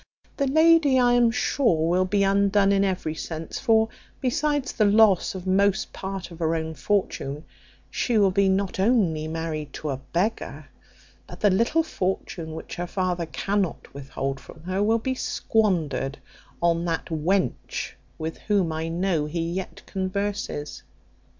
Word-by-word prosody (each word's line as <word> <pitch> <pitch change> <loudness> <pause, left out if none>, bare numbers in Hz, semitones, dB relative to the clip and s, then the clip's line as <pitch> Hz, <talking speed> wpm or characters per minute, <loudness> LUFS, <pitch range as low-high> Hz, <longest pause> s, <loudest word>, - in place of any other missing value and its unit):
The 280 - +1
lady, 315 -1 +5
I 245 -1 +4
am 240 -1 +5
sure, 230 - +1
will 180 +2 +2
be 200 +1 +1
undone 200 0 +3
in 200 0 +3
every 185 -5 -1
sense; 160 0 -5
for, 225 -3 +3 0.3
besides 290 +1 0
the 215 - +2
loss 205 -3 +4
of 185 -1 -6
most 195 +1 +2
part 190 -2 -5
of 170 - -11
her 165 0 +1
own 160 0 -3
fortune, 150 -2 -1 0.5
she 240 -3 0
will 200 -2 +4
be 195 +1 +3
not 190 0 0
only 190 -8 +2
married 155 -3 -4
to 150 - -4
a 135 - -2
beggar, 170 - -3 0.6
but - - -10
the 205 - +5
little 235 - +2
fortune 180 - -3
which - - -8
her 175 0 -3
father 180 -2 -1
cannot 195 +1 -2
withhold 135 -1 -4
from 160 +3 -14
her 185 +2 -1
will 220 +2 +3
be 260 +3 -2
squandered 175 - 0 0.5
on 170 0 +2
that 165 -1 -1
wench 165 -1 -1 0.3
with 160 0 -5
whom 200 -6 +1
I 160 +1 -3
know 165 -2 0
he 165 +2 -2
yet 185 +1 -5
converses. 190 -5 -3
190 Hz, 155 wpm, -25 LUFS, 160-210 Hz, 0.6 s, lady